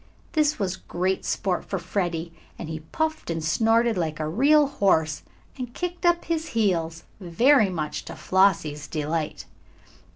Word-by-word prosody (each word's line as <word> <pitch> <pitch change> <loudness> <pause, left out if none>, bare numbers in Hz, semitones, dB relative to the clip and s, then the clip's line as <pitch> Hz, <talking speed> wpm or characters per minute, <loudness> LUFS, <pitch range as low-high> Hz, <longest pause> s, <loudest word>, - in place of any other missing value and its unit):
This 305 -1 +2
was 190 -3 -2
great 185 +2 -2
sport 185 -3 -1
for 195 - -3
Freddie, 175 -2 -3 0.2
and 170 - -6
he 160 0 -4
puffed 315 - -3
and 165 -1 -2
snorted 225 +6 +2
like 155 -2 -2
a 155 - -2
real 285 - +4
horse, 185 - +1 0.4
and 250 0 -6
kicked 355 0 -2
up 345 0 +2
his 330 -1 -2
heels, 170 -6 0 0.2
very 215 +6 +4
much 155 -4 -4
to - - -8
Flossie's 155 -6 +1
delight. 155 0 -3
185 Hz, 150 wpm, -25 LUFS, 160-250 Hz, 0.4 s, real